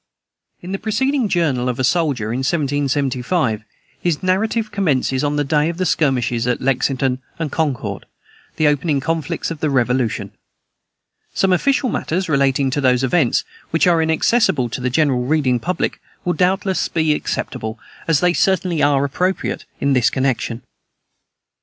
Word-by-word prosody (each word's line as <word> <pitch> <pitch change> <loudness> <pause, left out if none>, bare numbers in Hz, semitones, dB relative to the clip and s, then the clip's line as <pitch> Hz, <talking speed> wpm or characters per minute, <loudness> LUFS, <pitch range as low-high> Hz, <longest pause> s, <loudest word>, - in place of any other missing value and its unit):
In 180 - -6
the 195 - -2
preceding 245 +3 0
Journal 140 -9 +1
of 125 - -2
a 130 - -1
Soldier, 130 -7 +1
in 125 - -2
1775, 135 - 0 0.4
his 175 -2 -1
narrative 215 +4 0
commences 140 -9 0
on 145 0 0
the 145 - +1
day 150 +2 +1
of 170 - -5
the 185 - 0
skirmishes 125 -7 +1
at 125 - 0
Lexington 130 0 0 0.2
and 160 -3 -3
Concord, 125 -11 -2 0.5
the 155 - +2
opening 150 0 +1
conflicts 160 +2 -2
of 165 - -5
the 155 - 0
Revolution. 125 -3 0 1.0
Some 190 -1 +3
official 270 +8 +2
matters 180 +3 -2
relating 135 -2 +2
to 145 - -1
those 125 -1 +3
events, 130 -1 +2 0.3
which 165 - +2
are 170 -2 +4
inaccessible 160 - +2
to 125 - -5
the 125 - 0
general 130 -3 +1
reading 135 -4 +1
public, 180 +8 -2 0.2
will 175 - +1
doubtless 190 +1 +1
be 160 -2 +1
acceptable, 110 -5 -4 0.3
as 160 -3 +3
they 180 -1 +3
certainly 180 -4 +1
are 140 -1 +3
appropriate, 180 +7 -2
in 140 0 +1
this 125 -3 +3
connection. 130 -2 -1
145 Hz, 155 wpm, -19 LUFS, 130-175 Hz, 1.0 s, are